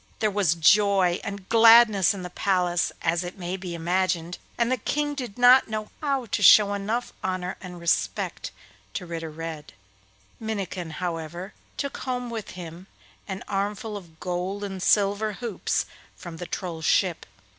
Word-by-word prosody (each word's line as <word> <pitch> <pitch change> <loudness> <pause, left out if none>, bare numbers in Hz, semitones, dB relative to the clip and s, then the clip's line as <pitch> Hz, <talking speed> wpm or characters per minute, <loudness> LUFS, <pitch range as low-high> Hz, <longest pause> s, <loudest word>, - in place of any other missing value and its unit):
There 215 -1 +1
was 195 -5 +2
joy 190 +1 +4
and 200 -1 -6
gladness 225 -4 +7
in 195 -2 -5
the 180 - -7
palace, 180 -3 +1
as 170 +2 +1
may 180 -1 -4
be 180 -2 -6
imagined, 175 0 -1 0.2
and 235 +1 +1
the 255 - +2
King 295 +6 -1
did 250 -8 -6
not 245 +1 +7
know 215 -1 -4
how 275 -4 0
to 205 - -2
show 205 +1 +7
enough 215 +5 -2
honour 185 -1 -2
and 180 -2 -9
respect 105 - -1 0.5
to - - -3
Ritter 165 -1 -5
Red. 155 -6 -7 0.7
Minnikin, 195 -6 -4
however, 170 +2 -5 0.2
took 280 -1 -3
home 250 -2 -4
with 220 -3 -5
him 175 +1 -9 0.4
an 190 - -5
armful 205 +2 -2
of 170 -5 -11
gold 185 +3 -3
and 195 -2 -5
silver 205 +2 +2
hoops 230 -2 -2 0.3
from 170 -2 -9
the 175 - -6
Troll's 170 -4 -5
ship. 180 -4 +1
190 Hz, 155 wpm, -25 LUFS, 175-215 Hz, 0.7 s, gladness